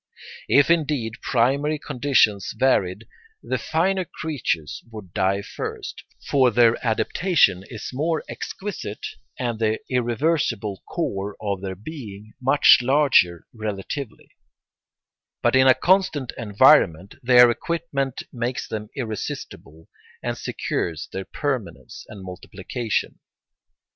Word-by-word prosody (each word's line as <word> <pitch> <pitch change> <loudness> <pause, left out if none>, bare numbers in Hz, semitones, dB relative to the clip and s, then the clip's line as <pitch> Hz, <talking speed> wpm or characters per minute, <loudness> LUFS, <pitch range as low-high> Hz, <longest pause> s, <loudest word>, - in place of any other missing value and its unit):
If 145 +3 +5
indeed 145 -9 0
primary 140 +5 +1
conditions 130 -8 +1
varied, 105 -5 +1 0.4
the - - -2
finer 185 +4 0
creatures 135 - -3
would 105 -6 -11
die 100 +1 +1
first; - - -6 0.2
for 130 -3 +4
their 120 0 +3
adaptation 115 - +2
is 115 -2 -7
more 155 +4 -1
exquisite 190 - -6 0.3
and 120 -3 -2
the 110 -1 +1
irreversible 120 - 0
core 100 +1 -3
of 100 -3 -3
their 95 -1 -4
being 110 - -9
much 135 +3 +6
larger 130 - +3
relatively; 110 +4 -6 1.1
but - - +3
in 130 0 +6
a 130 - +7
constant 175 -4 +2
environment 100 -4 +4
their 125 -1 +7
equipment 140 -2 -3
makes 120 0 -3
them 105 -1 -5
irresistible 110 - -6 0.4
and - - -2
secures 80 -3 -3
their 95 0 -4
permanence 135 -7 -4
and 100 -3 -10
multiplication. 95 +5 -4
120 Hz, 110 wpm, -23 LUFS, 100-140 Hz, 1.1 s, a